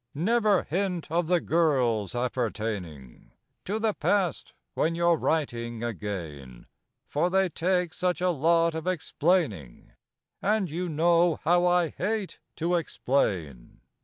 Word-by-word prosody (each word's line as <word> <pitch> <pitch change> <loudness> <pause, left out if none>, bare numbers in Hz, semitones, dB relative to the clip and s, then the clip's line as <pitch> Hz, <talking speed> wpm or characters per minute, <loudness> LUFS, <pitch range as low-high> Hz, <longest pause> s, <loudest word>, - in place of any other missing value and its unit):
Never 210 +4 +2
hint 180 -2 -2
of 170 0 +1
the 180 0 +3
girls 130 - +1
appertaining 105 - -4 0.3
To 205 +3 -1
the 220 -1 0
past 195 -5 0 0.2
(when 165 +1 0
you're 170 0 +3
writing 120 -8 -2
again), 80 - -6 0.4
For 155 +5 0
they 190 0 +2
take 180 0 0
such 180 -1 -1
a 180 0 +2
lot 165 +2 +2
of 160 +2 -5
explaining, 150 - -1 0.5
And 205 -5 +1
you 175 +2 -3
know 170 +1 +3
how 175 +2 +3
I 175 -2 +3
hate 210 +2 -3 0.2
to 170 +2 -1
explain. 95 - -1
165 Hz, 125 wpm, -27 LUFS, 120-180 Hz, 0.5 s, the